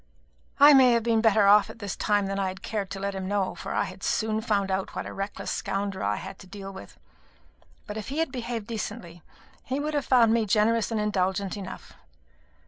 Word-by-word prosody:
I 290 +1 +9
may 260 -3 +7
have 235 -1 +2
been 225 -1 +2
better 220 -2 +4
off 200 0 +6
at - - -10
this 205 -4 -5
time 205 -1 +1
than 195 0 -2
I 195 - 0
had 185 0 -7
cared 205 -3 -3
to 195 - -6
let 200 0 -2
him 190 -1 -4
know, 200 -1 0
for - - -7
I - - +1
had - - -8
soon 220 0 0
found 200 -4 0
out 190 0 -2
what - - -4
a - - -7
reckless 195 +1 -4
scoundrel 195 0 -3
I 105 +1 +1
had 190 - -8
to 185 - -13
deal 195 0 -8
with; 100 - -11 0.9
but 210 - -6
if 215 - -6
he 280 - -4
had 325 -4 0
behaved 235 -4 -4
decently, 210 -6 -6 0.4
he 265 +2 -3
would 305 +1 -2
have 290 -2 0
found 235 -4 +5
me 230 -2 +1
generous 220 +2 +2
and 225 -2 -1
indulgent 195 -1 -1
enough. 195 -2 -8
210 Hz, 225 wpm, -26 LUFS, 195-230 Hz, 0.9 s, I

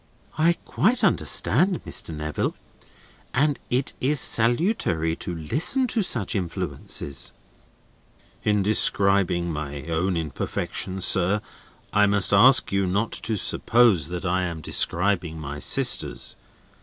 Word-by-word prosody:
"I 165 +3 +3
quite 245 +6 +1
understand, 185 -1 +2
Mr. - - -3
Neville. 75 -1 -4 0.8
And 145 +2 +1
it 130 +2 -1
is 140 +2 0
salutary 115 - +1
to 90 - -5
listen 160 - 0
to 225 - 0
such 120 - 0
influences." 85 -6 -3 1.1
"In 105 -1 +1
describing 95 -4 +2
my 75 -2 -6
own 85 +3 -2
imperfections, 85 +4 -3
sir, 95 +2 +3 0.5
I 105 0 +4
must 100 -1 +3
ask 130 +7 +5
you 100 -1 0
not 100 +5 -1
to 110 - -3
suppose 110 - +2
that 90 +1 -6
I 90 +1 0
am 85 -3 -5
describing 85 0 +1
my 75 -1 -7
sister's. - - +2
95 Hz, 120 wpm, -23 LUFS, 85-120 Hz, 1.1 s, ask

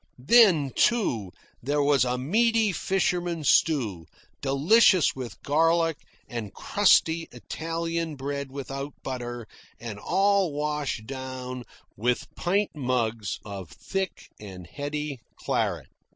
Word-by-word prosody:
Then, 180 - +6
too, 120 - +1 0.3
there 145 +3 +1
was 140 -2 +4
a 125 0 0
meaty 220 - +2
fisherman's 175 -3 0
stew, 110 - +1 0.3
delicious 165 +7 +4
with 125 -3 -7
garlic, 165 +2 +2 0.3
and 115 -5 -5
crusty 165 -5 +3
Italian 165 0 -3
bread 140 0 -4
without 135 +1 -5
butter, 120 -2 -5 0.3
and 110 -4 -7
all 195 - +2
washed 150 -6 -2
down 130 -1 -6 0.3
with 120 +4 -1
pint 200 +4 0
mugs 120 -6 -1
of 100 -5 -7
thick 190 - -4
and 95 -4 -9
heady 145 - -4 0.2
claret. - - -1
145 Hz, 110 wpm, -26 LUFS, 125-170 Hz, 0.3 s, Then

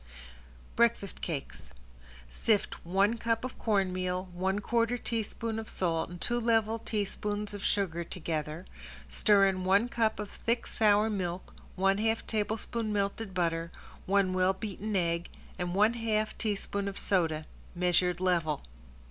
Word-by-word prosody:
~BREAKFAST 235 -4 +2
CAKES~ 155 -6 -5 0.6
Sift 205 - 0
one 195 +6 +2
cup 230 +2 0
of 255 - -7
corn 195 -4 +1
meal, 185 0 -2
one 190 +2 0
quarter 230 +3 +1
teaspoon 225 -1 -3
of 220 - -6
salt 165 -3 0
and 175 0 -8
two 240 +6 0
level 225 -1 +2
teaspoons 210 -1 -2
of 205 0 -6
sugar 175 -4 0
together, 160 -1 -4 0.5
stir 205 -2 +5
in 190 -1 +1
one 200 +5 +4
cup 225 -4 +1
of 210 -1 -5
thick 235 +1 -1
sour 210 -1 +3
milk, 185 -4 -3 0.2
one 195 +1 +2
half 225 +1 +1
tablespoonful 220 +1 -2
melted 200 0 -1
butter, 165 -1 0 0.4
one 195 -1 +3
well 185 +1 +3
beaten 210 +1 -4
egg 170 -2 0 0.3
and 180 0 -2
one 210 +3 +5
half 215 -2 0
teaspoon 200 -2 -2
of 200 - -4
soda, 160 -5 +1 0.3
measured 180 0 +2
level. 170 -5 +1
200 Hz, 140 wpm, -30 LUFS, 180-220 Hz, 0.6 s, stir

